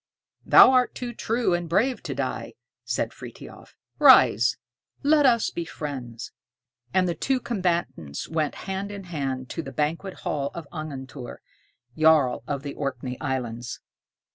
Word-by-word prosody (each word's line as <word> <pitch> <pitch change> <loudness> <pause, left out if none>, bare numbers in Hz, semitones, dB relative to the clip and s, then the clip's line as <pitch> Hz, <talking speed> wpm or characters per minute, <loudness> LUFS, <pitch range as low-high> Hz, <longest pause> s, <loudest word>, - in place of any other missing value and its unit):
"Thou - - +8
art 255 -1 +3
too 245 -1 -5
true 230 -3 0
and 175 -1 -2
brave 240 +9 +1
to - - -5
die," - - -3 0.3
said - - -2
Frithiof. - - -12 0.2
"Rise, - - +6 0.5
let 295 -1 +5
us 235 -3 +3
be 170 - -3
friends." 130 -8 -6 0.6
And 185 +3 +2
the 175 - 0
two 260 - 0
combatants 175 - -2
went 155 -3 -1
hand 195 +1 -3
in 200 -1 -7
hand 135 -7 -4
to 165 - -3
the 135 - -8
banquet 160 +8 -2
hall 140 -2 -2
of 170 -3 -7
Angantyr, 140 -5 -7 0.6
Jarl 155 -5 +4
(earl) - - -29
of 140 -1 -3
the 140 -1 -5
Orkney 130 -3 -4
Islands. 120 -3 -3
155 Hz, 145 wpm, -25 LUFS, 135-195 Hz, 0.6 s, Thou